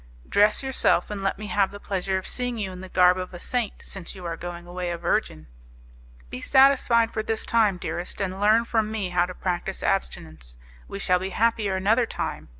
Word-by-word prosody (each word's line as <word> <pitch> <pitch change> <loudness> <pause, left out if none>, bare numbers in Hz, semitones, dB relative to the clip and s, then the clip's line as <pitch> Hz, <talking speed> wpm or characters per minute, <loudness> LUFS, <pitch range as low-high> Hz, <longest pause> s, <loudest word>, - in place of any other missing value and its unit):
"Dress 210 +5 +3
yourself, 265 -4 +1
and 205 -1 -4
let 195 - -1
me 215 - -7
have 205 -2 +1
the 205 - -10
pleasure 190 -1 -2
of 190 - -5
seeing 245 -1 -2
you 195 -3 -3
in 180 0 -9
the 190 - -9
garb 180 0 +4
of 185 0 -6
a - - -8
saint, 240 +1 -2
since 195 -1 -5
you 185 -2 -9
are 165 -1 -3
going 175 0 -7
away 175 0 -4
a 170 - -3
virgin." 170 - -1 0.9
"Be 125 - -6
satisfied 265 -4 +4
for 220 - -2
this 220 0 -2
time, 215 -5 +2
dearest, 175 0 -5
and 190 0 -3
learn 220 +3 +4
from 220 -2 0
me 210 -4 -2
how 175 0 +1
to 185 - -8
practice 185 +1 -3
abstinence; 80 - -3 0.3
we 200 - -6
shall 180 -2 +2
be 190 +1 -4
happier 215 -1 +1
another 220 +5 +2
time. - - -5
195 Hz, 210 wpm, -25 LUFS, 180-220 Hz, 0.9 s, garb